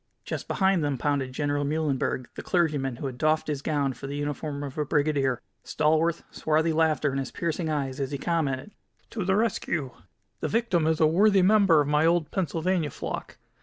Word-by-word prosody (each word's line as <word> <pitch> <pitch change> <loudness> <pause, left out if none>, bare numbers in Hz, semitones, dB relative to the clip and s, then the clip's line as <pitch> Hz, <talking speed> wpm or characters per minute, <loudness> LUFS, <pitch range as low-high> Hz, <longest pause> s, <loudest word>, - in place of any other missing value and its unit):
Just - - -5
behind 190 -4 +2
them 145 -2 0
pounded 140 -1 -1
General 145 +1 -1
Muhlenberg, 145 -4 -1
the - - -7
clergyman 150 -8 0
who 130 - -7
had 130 -2 -5
doffed 155 0 +2
his 145 -3 -2
gown 140 -3 0
for 135 - -8
the 140 - -5
uniform 145 0 -3
of 140 -2 -6
a - - +2
brigadier, 145 -4 0 0.2
stalwart, 160 +2 +1
swarthy, 160 +1 +1
laughter 155 -2 +2
in 135 - -2
his 135 - -3
piercing 165 0 -2
eyes 140 -3 -2
as 135 -1 -1
he 140 - -3
commented: 150 0 -1 0.4
"To 215 - -3
the 190 +1 +2
rescue. 170 - -1 0.5
The - - -2
victim 200 -8 +1
is 160 -1 +1
a 160 - +5
worthy 195 +4 +4
member 195 -5 +5
of 145 - -1
my 150 +2 +3
old 170 -3 +1
Pennsylvania 170 -2 0
flock. - - -6
155 Hz, 190 wpm, -26 LUFS, 140-170 Hz, 0.5 s, a